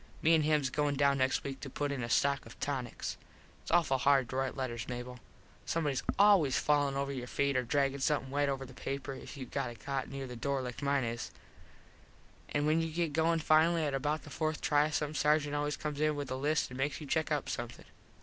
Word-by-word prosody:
Me 165 - +5
an 160 - +5
hims 150 -3 +2
goin 145 0 +1
down 140 0 +3
next 130 0 +1
week 135 -1 -5
to 140 - -7
put 145 +2 -2
in 140 -3 -3
a 115 - -3
stock 140 +2 +2
of - - -13
tonics. 130 -4 -3 0.4
Its - - -10
awful 165 -6 +3
hard 135 -2 +4
to 130 - -6
rite 135 0 -1
letters, 120 -4 -3
Mable. 125 0 -6 0.5
Somebodys 150 -5 0 0.2
always 195 -9 +5
fallin 145 -2 +2
over 140 0 -1
your 125 -3 -5
feet 140 +2 0
or 130 - +3
draggin 140 +2 0
something 135 -2 0
wet 145 0 +1
over 135 -1 -2
the 130 - -12
paper 135 +2 -4
if 135 +2 -9
youve 130 -3 -8
got - - -1
a 120 - -8
cot 135 +2 -3
near 135 0 -5
the 125 -1 -7
door 135 +3 -1
like 125 +2 -6
mine 140 -1 +1
is. 115 0 -3 1.2
An 145 0 0
when 155 +2 +3
you 165 - -2
get 165 -2 -1
goin 165 +2 +2
finally 160 +1 +4
at 145 - -1
about 145 +3 -1
the 145 - -11
fourth 155 0 -1
try 150 0 +3
some 150 -1 -1
sargent 150 0 +2
always 145 0 -1
comes 150 -1 -4
in 155 0 +2
with 140 -2 -4
a - - 0
list 145 +1 0
and 125 - -7
makes 145 +2 -1
you 155 - -7
check 155 +2 0
up 150 -2 0
something. 120 0 -5
140 Hz, 230 wpm, -32 LUFS, 130-150 Hz, 1.2 s, Me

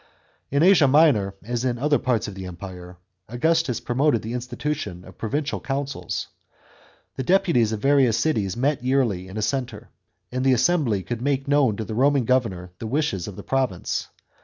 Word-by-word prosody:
In 140 +3 +2
Asia 175 -6 +6
Minor, 130 -10 +4
as 120 +2 -3
in 125 -2 0
other 145 +3 +2
parts 120 -5 0
of 105 - -6
the 95 -1 -7
Empire, 90 0 -9 0.3
Augustus 160 +2 +1
promoted 125 -1 +1
the 115 +2 -5
institution 125 -6 -4
of 95 - -15
provincial 140 +6 -2
councils. 140 0 -4 0.9
The - - -1
deputies 150 - +3
of 110 -2 -3
the - - 0
various 135 -6 +4
cities 110 -11 0
met 135 +1 0
yearly 125 -9 +1
in 95 +3 -8
a 110 - -1
centre, 120 -1 -3 0.4
and 130 +1 -2
the 135 -1 +4
assembly 125 - +2
could 120 +2 -4
make 135 0 -1
known 140 -7 +3
to 110 - -4
the 110 - -5
Roman 135 +2 +3
governor 105 -8 0
the 115 - -5
w^hes 120 - -1
of 100 - -7
the - - -9
province. 130 -9 -1
125 Hz, 180 wpm, -23 LUFS, 105-140 Hz, 0.9 s, Asia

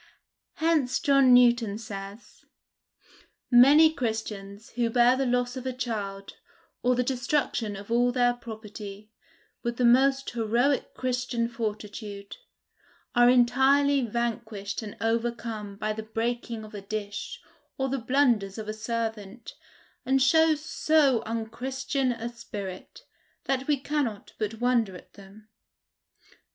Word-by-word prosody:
Hence 310 -6 +1
John 275 -4 +4
Newton 240 -4 +5
says, 205 -1 -9 1.0
"Many 290 +6 +7
Christians, 220 -5 -5
who 235 -1 0
bear 240 +2 +4
the 270 0 0
loss 245 0 0
of 260 0 -5
a 260 - -2
child, 205 -6 -5 0.4
or 250 +1 +2
the 250 - +1
destruction 245 -4 -1
of 200 +3 -9
all 245 +1 +3
their 245 -1 +2
property, 215 -3 -9 0.5
with 235 -1 -3
the 250 - +2
most 270 +3 +4
heroic 240 +4 0
Christian 245 -2 -1
fortitude, 210 -3 -6 0.8
are 240 0 +6
entirely 270 +3 +4
vanquished 230 -3 -3
and 210 -2 -8
overcome 225 -2 -2
by 215 +1 -2
the 220 - -5
breaking 230 +1 -3
of 215 - -12
a 205 - -6
dish, 205 0 -5 0.4
or 265 - 0
the 270 0 -2
blunders 235 -6 +1
of 215 -1 -6
a 215 - -3
servant, 220 -1 -5 0.5
and 265 +1 +2
show 320 +4 +4
so 300 -4 +2
unchristian 255 +4 -2
a 235 -1 -4
spirit, 205 -6 -8 0.4
that 270 0 -1
we 295 -2 +2
cannot 270 -6 -3
but 215 0 -2
wonder 235 -4 +1
at - - -14
them." 200 +2 -15
235 Hz, 125 wpm, -27 LUFS, 215-255 Hz, 1.0 s, Many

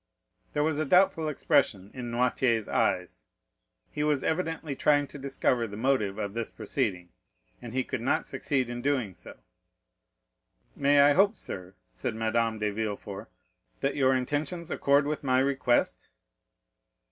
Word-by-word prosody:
There 145 - +1
was 155 -1 0
a 155 - 0
doubtful 180 -1 +3
expression 105 -8 +1
in 125 -2 -6
Noirtier's 120 -2 +1
eyes; 75 -10 -1 0.7
he 150 - -2
was 150 -3 +1
evidently 160 -3 -2
trying 145 +1 +3
to 145 - -10
discover 130 -3 0
the 105 0 -8
motive 110 -5 +1
of 100 -2 -3
this 115 0 -3
proceeding, 100 -6 -3 0.5
and 120 -2 -8
he 130 +1 0
could - - -4
not 120 - +1
succeed 135 -1 -1
in 120 0 -5
doing 130 -7 0
so. - - -12 1.4
"May 140 0 +4
I 145 +1 +6
hope, 200 +6 +4
sir," 95 - -6 0.2
said - - -4
Madame 115 0 0
de 105 -1 -1
Villefort, 105 -2 -5 0.5
"that 140 - 0
your 130 -2 +3
intentions 150 +6 -2
accord 140 +1 +3
with 150 0 -3
my 130 -2 +2
request?" 130 -2 +1
130 Hz, 145 wpm, -28 LUFS, 110-145 Hz, 1.4 s, I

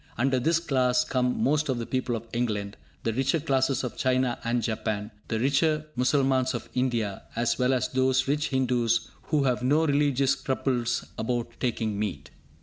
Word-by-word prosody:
Under 130 +2 +2
this 160 +5 +2
class 130 -6 +2
come 125 0 0
most 150 +1 +2
of 130 - +1
the 115 - -3
people 130 -1 -1
of 115 0 -6
England, 105 -4 -2 0.3
the 115 - 0
richer 135 +6 +1
classes 135 -3 +1
of 125 - -5
China 130 -1 +1
and 120 0 0
Japan, 110 -1 -2 0.2
the 110 - -1
richer 150 +4 +2
Mussalmans 130 0 +2
of - - -6
India, 120 -6 -1
as 120 +2 0
well 125 +1 +3
as 130 -2 +1
those 130 0 +2
rich 150 +2 +1
Hindus 125 -4 +1
who 150 -2 +1
have 125 -2 +1
no 145 +6 +3
religious 140 -2 +2
scruples 125 -3 -1
about 120 +1 -1
taking 110 -4 -1
meat. 75 -10 -4
125 Hz, 170 wpm, -27 LUFS, 115-135 Hz, 0.3 s, well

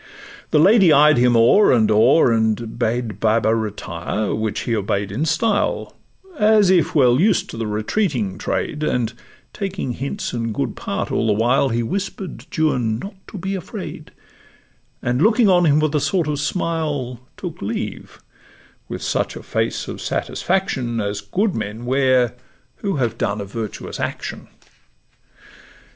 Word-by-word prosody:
The - - +2
lady 190 +2 +6
eyed 150 0 +6
him 120 -1 +4
o'er 120 - +5
and 110 -4 +3
o'er, 120 +6 +5
and 110 0 0
bade 115 -1 -1
Baba 110 0 +2
retire, 105 -2 -3
which 110 -1 -2
he 115 - -1
obey'd 100 -1 -1
in 130 +10 -1
style, 200 +7 0 0.4
As 210 -3 +5
if 175 -3 +2
well 125 -3 +5
used 205 +6 +2
to - - -8
the 115 -1 -3
retreating 110 - -1
trade; 150 - -2
And 125 -6 0 0.4
taking 195 -9 -3
hints 140 - -4
in 115 -2 -2
good - - -2
part - - -4
all 115 - 0
the 105 - +3
while, 120 +6 +2
He 120 0 0
whisper'd 190 - -5
Juan 125 - +1
not 195 - -7
to - - -8
be 190 +2 -3
afraid, 190 -3 -7 0.9
And 125 +2 0
looking 220 +3 +4
on 175 -2 +4
him 150 -1 +4
with 155 -1 0
a 150 - +2
sort 170 +2 0
of 150 -1 -1
smile, 145 -6 -2 0.2
Took 175 -4 -7
leave, 105 0 -5 0.7
with - - -5
such - - -1
a - - -8
face - - -2
of - - -6
satisfaction 135 - -1
As 100 -1 -2
good 185 - 0
men 110 +2 -5
wear 130 -2 +2 0.4
who 200 -3 -2
have 120 -6 -1
done 100 +1 -1
a 100 - -4
virtuous 110 +1 -6
action. - - -5
125 Hz, 155 wpm, -20 LUFS, 110-170 Hz, 0.9 s, lady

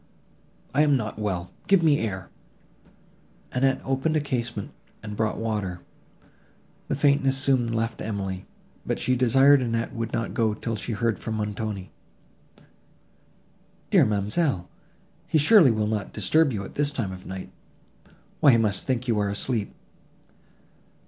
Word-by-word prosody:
"I 145 - +3
am 145 -2 +4
not 110 -3 -5
well; 95 -4 -3 0.2
give 195 -3 +4
me 150 -3 +4
air." 95 -4 -4 1.2
Annette 135 +1 +1
opened 135 +4 0
a - - +3
casement, 120 -7 -3 0.3
and 105 -1 -6
brought 110 0 -1
water. 105 -6 -3 1.1
The - - -1
faintness 140 -1 +3
soon 130 -4 +2
left 115 0 -2
Emily, 95 -3 -4 0.4
but - - -2
she 130 - +1
desired 135 +3 +5
Annette 115 0 -2
would 115 -2 -4
not 115 - -2
go 110 -2 +1
till 115 +1 -3
she 115 +2 -4
heard 115 -1 0
from 110 - -4
Montoni. 105 -2 -4 2.0
"Dear - - +6
ma'amselle! 105 - 0 0.6
he - - +2
surely 160 - +6
will 110 -2 +1
not 105 -1 -3
disturb 160 -3 +2
you 100 -4 -4
at - - -11
this 145 0 +1
time 115 -9 -3
of 95 0 -10
night; 95 0 -7 0.9
why 145 -5 +6
he - - +5
must 105 -3 +1
think 130 -1 -1
you 115 -3 +1
are 100 -1 0
asleep." 105 +1 -2
115 Hz, 145 wpm, -25 LUFS, 105-135 Hz, 2.0 s, Dear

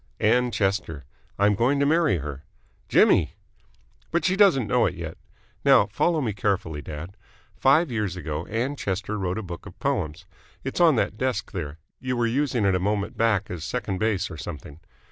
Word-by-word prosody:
"Ann 125 +3 +3
Chester. 95 - -1 0.3
I'm 100 +1 +4
going 120 +7 +2
to 140 - +3
marry 155 - +3
her." 75 -2 -6 0.5
"Jimmy!" - - +4 0.7
"But 170 - 0
she 185 - +3
doesn't 190 - +5
know 105 - +3
it - - -3
yet. - - -6 0.5
Now, - - +6
follow 165 -3 +1
me 115 -6 -1
carefully, 90 -6 -1
dad. 80 +7 -8 0.4
Five 145 +3 +3
years 105 -6 -1
ago 80 -2 -4
Ann 120 +6 -1
Chester 100 -2 -3
wrote 95 0 -2
a 110 - -3
book 85 -3 -8
of - - -12
poems. 80 +4 -2 0.4
It's 135 +6 -2
on 165 -4 +6
that 105 -2 -1
desk 130 -6 -1
there. 80 -6 -5 0.2
You 125 -1 -2
were 120 - +2
using 125 -2 0
it 95 - +3
a 90 - +1
moment 100 +2 -1
back 110 -3 +1
as 85 -3 -5
second 100 -1 -3
base 110 -3 0
or - - -7
something. 75 -1 -8
105 Hz, 185 wpm, -25 LUFS, 90-125 Hz, 0.7 s, Now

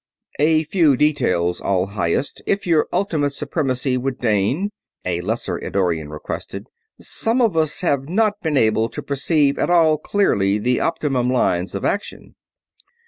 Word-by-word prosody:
"A 155 +1 +3
few 155 -4 +3
details, 90 - +1
All 95 -2 +1
Highest, 100 +5 -2
if 200 0 0
Your 165 -3 +2
Ultimate 155 -8 0
Supremacy 135 -3 -1
would 130 0 -3
deign," 120 - 0 0.3
a 90 -1 -1
lesser 110 +6 -2
Eddorian 85 -6 -1
requested. 75 0 -6 0.3
"Some 230 +3 -1
of 225 -8 +2
us 155 -2 +1
have 140 -5 0
not 210 +2 +1
been 155 -3 0
able 110 -1 +2
to - - -7
perceive 140 0 +1
at - - 0
all 160 -3 +4
clearly 105 - +1
the 125 +4 0
optimum 140 -7 0
lines 95 -7 0
of 100 - -3
action." 205 - -3
140 Hz, 145 wpm, -20 LUFS, 105-160 Hz, 0.3 s, all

